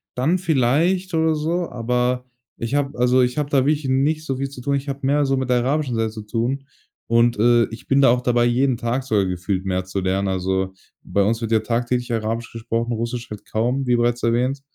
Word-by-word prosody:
dann 150 +9 +2
vielleicht 170 +4 +1
oder 160 -1 +2
so, 165 +3 -1
aber 125 +1 -1 0.3
ich 115 +3 -4
habe 140 -1 -1
also, 125 +1 +4
ich 125 +1 0
habe 145 -1 -1
da 135 -2 +2
wirklich 150 -1 +1
nicht 145 +4 +1
so 135 -3 -2
viel 135 +1 -2
zu 135 -2 -10
tun. 140 +3 0
Ich 140 +1 -3
habe 140 0 -4
mehr 145 +1 +2
so 135 0 +1
mit 130 -1 -2
der 125 - +3
arabischen 130 +1 0
Seite 115 -1 0
zu 110 0 -8
tun 120 +5 -2 0.4
und, 115 0 +3
äh, 120 +1 +5
ich 115 - -11
bin 135 +1 +3
da 135 - +6
auch 125 +1 +3
dabei, 120 -1 +2
jeden 125 +1 +2
Tag 120 +3 -2
sogar 105 -7 +1
gefühlt 90 +1 -2
mehr 95 -1 -1
zu 95 +1 -3
lernen. 95 +1 0
Also, 95 0 -1 0.3
bei 100 - 0
uns 115 +3 0
wird 115 -1 -3
ja 110 - +4
tagtäglich 120 +2 -1
Arabisch 115 +1 -2
gesprochen, 115 +1 -3
Russisch 120 +1 -4
halt 105 -1 -8
kaum 125 +5 0
wie 125 - +3
bereits 120 0 0
erwähnt. 125 +4 +1
125 Hz, 225 wpm, -21 LUFS, 115-135 Hz, 0.4 s, da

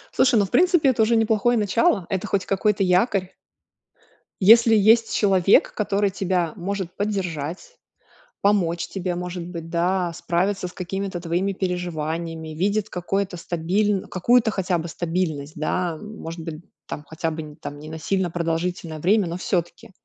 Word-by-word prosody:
Слушай, 255 -2 +4
ну, 200 - +3
в - - -11
принципе, 350 -6 +4
это 235 -3 +2
уже 230 +2 +3
неплохое 225 +1 +2
начало, 210 - +2
это 190 -1 -2
хоть 195 -2 0
какой-то 200 +1 +1
якорь. 185 +1 +1 1.1
Если 225 +3 +7
есть 225 +2 +4
человек, 195 -2 +4
который 205 -1 0
тебя 185 -4 -1
может 190 0 -4
поддержать, 185 - -4 0.6
помочь 180 -5 +1
тебе, 185 -2 -3
может 180 0 -5
быть, 170 -2 -7
да, 175 +1 0
справиться 185 +3 -1
с - - -13
какими-то 190 0 -4
твоими 175 +4 -1
переживаниями, 165 -3 -3
видит 200 +5 0
какое-то 190 +1 -2
стабиль 185 +4 0
какую-то 235 +5 +3
хотя 190 -3 -1
бы 165 +1 -5
стабильность, 165 -4 -3
да, 165 +2 -1
может 175 -4 -8
быть, 160 0 -7 0.2
там, 150 - -6
хотя 160 +1 -2
бы 155 -1 -7
там 145 - -7
не 155 +1 -10
на 160 0 -6
сильно 190 +1 -1
продолжительное 165 -1 -2
время, 195 +3 +3
но 170 - -4
всё-таки. 175 -2 -3
180 Hz, 150 wpm, -23 LUFS, 170-200 Hz, 1.1 s, Если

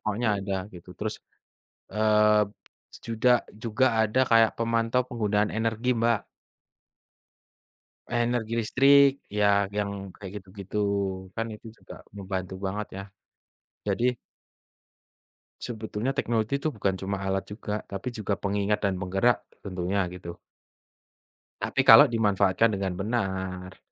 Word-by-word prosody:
Pokoknya 110 +2 -1
ada 95 0 -3 0.2
gitu. 90 +1 -12
Terus, 105 0 -4 0.7
eee, 105 0 +4 0.6
juda 115 +2 +1 0.3
juga 115 +3 0 0.2
ada 110 +5 +2
kayak 115 -1 +5
pemantau 115 +1 +1
penggunaan 105 -3 0
energi, 115 +3 0
Mbak. 115 -2 +2 1.9
Energi 120 -1 0
listrik 140 +4 +5 0.3
ya 105 - +4 0.3
yang 100 -1 -1 0.2
kayak 95 -3 -9
gitu-gitu, 95 +1 -11 0.6
kan 115 - -1
itu 115 - -14
juga - - -12 0.2
membantu 95 -1 -4
banget 105 +2 -3
ya. 100 - -5 0.8
Jadi 125 +1 +1 1.4
sebetulnya 110 +2 -3
teknologi 120 +3 -1
itu 155 - 0
bukan 100 -8 -1
cuma 95 +1 -2
alat 95 +1 -2
juga, 105 0 -4
tapi 100 +6 -5
juga 105 -3 -2
pengingat 100 +1 0
dan 95 - +1
penggerak 95 +6 +2 0.2
tentunya, 95 +1 -1
gitu. 85 -1 -8 1.2
Tapi - - +1
kalau - - +9
dimanfaatkan 105 -2 +2
dengan 95 -2 -2
benar. 95 -3 -3
105 Hz, 115 wpm, -27 LUFS, 95-115 Hz, 1.9 s, kalau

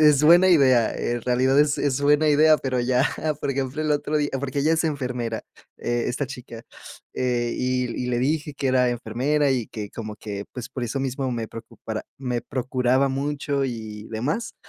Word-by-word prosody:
es 150 -2 +6
buena 175 +4 +7
idea. 130 -9 +5
En 120 0 -2
realidad 130 +3 +2
es 150 -1 +2
es 140 -1 0
buena 150 +2 +4
idea, 155 +1 +6
pero 130 -3 -1
ya 125 +1 +2 0.4
Por - - -1
ejemplo, 135 +2 -2
el 155 - -1
otro 150 +1 0
día, 145 -1 0
porque 140 0 -2
ella 155 +3 +3
es 165 0 +1
enfermera, 125 -6 -2 0.3
eh, 120 0 -1
esta 135 +3 -2
chica, 125 -3 -9 0.5
eh, 120 -2 0
y 125 -1 -1
y - - -3
le 120 -1 0
dije 150 +3 -1
que 140 -1 -1
era 130 -1 +3
enfermera 125 +5 0
y 125 -4 0
que 105 -3 -7
como 110 -2 -7
que, 100 -2 -6
pues, 125 0 -6
por 130 -1 -5
eso 120 +4 -3
mismo 135 0 -2
me 115 -2 -3
preocupara 115 0 -7 0.2
me 125 -3 -2
procuraba 130 +1 +1
mucho 140 0 -1
y 110 -3 -6
demás, 145 - -2
130 Hz, 190 wpm, -24 LUFS, 120-145 Hz, 0.5 s, buena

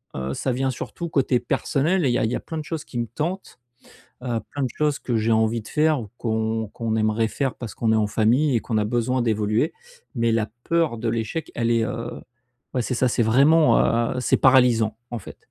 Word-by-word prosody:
heu, 65 +1 -3
ça 130 - -1
vient 130 +1 0
surtout 170 +7 -6
côté 135 -4 +2
personnel 150 +8 0
et - - +3
il - - +1
y - - +2
a - - +1
il 110 - -1
y - - 0
a - - -2
plein 160 - -6
de - - -5
choses 155 0 -5
qui 120 - -8
me 120 - 0
tentent, 160 - -4 0.6
heu, 120 -3 -1
plein 145 - -3
de 130 - 0
choses 150 -2 +1
que 120 -3 -1
j'ai 110 +1 +1
envie 110 +1 +2
de 105 - -13
faire 155 -1 +2
ou 110 - -8
qu'on 110 -1 -1
qu'on 115 -1 -3
aimerait 110 +1 +1
faire 135 -1 -1
parce 120 -3 -8
qu'on 115 -2 +1
est - - +3
en 105 -1 +2
famille 120 +7 +2
et - - +3
qu'on 110 - -2
a 105 - 0
besoin 120 +3 0
d'évoluer. 110 +5 +1 0.4
Mais 115 -1 +1
la 110 -1 0 0.2
peur 165 -7 +1
de 115 +1 -2
l'échec, 115 +8 -3
elle 115 -1 0
est, 115 -1 +2
heu 115 +1 -5 0.5
ouais, 130 - +1
c'est 115 - -2
ça, 130 - +2
c'est 120 - 0
vraiment, 145 +8 +5 0.4
heu, - - -1
c'est - - +2
paralysant 120 -5 +4
en 120 - -3
fait. - - -11
120 Hz, 235 wpm, -23 LUFS, 110-135 Hz, 0.6 s, vraiment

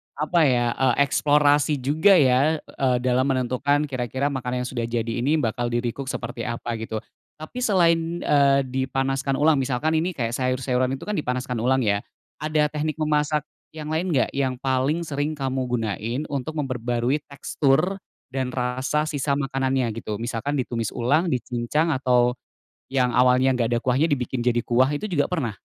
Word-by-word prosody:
apa 155 +3 +2
ya 120 -2 +2
eee, 130 -2 +2
eksplorasi 145 +1 +3
juga 160 +9 +4
ya, 145 +2 +3
eee, 130 -3 -1
dalam 130 +1 +2
menentukan 130 +2 +1
kira-kira 130 +1 -2
makanan 125 -2 -3
yang 125 - -4
sudah 120 -3 -3
jadi 115 -1 -2
ini 155 +3 +2
bakal 120 -1 -1
di-recook 120 +3 -2
seperti 115 - -5
apa, 120 0 -3
gitu. 110 -1 -4 0.4
Tapi 155 +11 -7
selain, 180 -8 +3 0.2
eee, 140 -1 +4
dipanaskan 135 +1 -1
ulang 150 0 +3
misalkan 135 +5 0
ini 170 +4 +1
kayak 115 -4 -2
sayur-sayuran 130 0 0
itu - - -10
kan 210 - -1
dipanaskan 125 - -2
ulang 130 +3 +2
ya, 100 -2 +2 0.4
ada 155 -1 +1
teknik 155 0 -2
memasak 150 -1 +1 0.3
yang 155 0 -6
lain 165 +4 0
nggak 135 -5 +1
yang 135 -2 -1
paling 135 +5 0
sering 150 0 -2
kamu 130 -2 -2
gunain 115 +3 -2
untuk 140 +3 -3
memperbarui 125 -1 -1
tekstur 145 +6 0 0.3
dan 130 -1 -2
rasa 130 +4 0
sisa 140 -1 -1
makanannya, 135 -2 0 0.2
gitu? 105 - -3
Misalkan 120 +5 -3
ditumis 115 -3 -2
ulang, 145 +8 +2
dicincang 125 +6 0
atau, 125 -2 +2 0.6
yang 125 -3 +1
awalnya 125 +1 +4
nggak 120 -2 0
ada 120 - +2
kuahnya 130 +3 +1
dibikin 125 -2 -1
jadi 120 -1 +2
kuah, 130 +4 +3
itu 150 +9 -3
juga 150 -7 +1
pernah? 130 - -2
130 Hz, 160 wpm, -24 LUFS, 125-150 Hz, 0.6 s, juga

